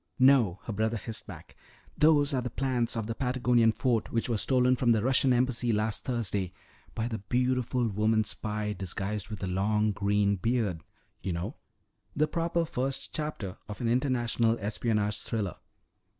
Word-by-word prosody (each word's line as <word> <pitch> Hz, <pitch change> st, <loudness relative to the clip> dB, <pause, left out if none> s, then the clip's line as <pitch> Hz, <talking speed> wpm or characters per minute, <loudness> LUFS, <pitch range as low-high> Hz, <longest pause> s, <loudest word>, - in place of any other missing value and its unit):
"No," 130 Hz, -9 st, +4 dB
her 115 Hz, -, -5 dB
brother 110 Hz, +2 st, 0 dB
hissed 110 Hz, 0 st, -6 dB
back, -, -, -11 dB, 0.4 s
"those 150 Hz, -1 st, +4 dB
are 130 Hz, -, +1 dB
the 125 Hz, -, -3 dB
plans 125 Hz, -2 st, 0 dB
of 110 Hz, -, -2 dB
the 115 Hz, -, -3 dB
Patagonian 125 Hz, -2 st, +2 dB
fort 115 Hz, -1 st, 0 dB
which 115 Hz, -, 0 dB
were 115 Hz, -, +1 dB
stolen 125 Hz, +1 st, +3 dB
from 120 Hz, -2 st, +3 dB
the 110 Hz, -2 st, +1 dB
Russian 130 Hz, +1 st, +4 dB
Embassy 125 Hz, -1 st, +2 dB
last 105 Hz, 0 st, 0 dB
Thursday 100 Hz, -7 st, -2 dB, 0.4 s
by 115 Hz, 0 st, -1 dB
the 115 Hz, -2 st, -4 dB
beautiful 125 Hz, +2 st, 0 dB
woman 110 Hz, +1 st, +2 dB
spy 105 Hz, 0 st, -3 dB
disguised 100 Hz, +1 st, -3 dB
with 105 Hz, -2 st, -6 dB
a -, -, -1 dB
long 105 Hz, +3 st, +1 dB
green 100 Hz, 0 st, +1 dB
beard. 110 Hz, -5 st, 0 dB, 0.4 s
You 95 Hz, -1 st, -2 dB
know, 90 Hz, -, -4 dB, 0.6 s
the 155 Hz, +1 st, +2 dB
proper 170 Hz, +1 st, 0 dB
first 135 Hz, -3 st, -3 dB
chapter 150 Hz, -, -4 dB
of 105 Hz, -, -6 dB
an 120 Hz, -, -1 dB
international 120 Hz, -2 st, +1 dB
espionage 105 Hz, -1 st, 0 dB
thriller. 105 Hz, -6 st, -3 dB
115 Hz, 165 wpm, -29 LUFS, 105-125 Hz, 0.6 s, No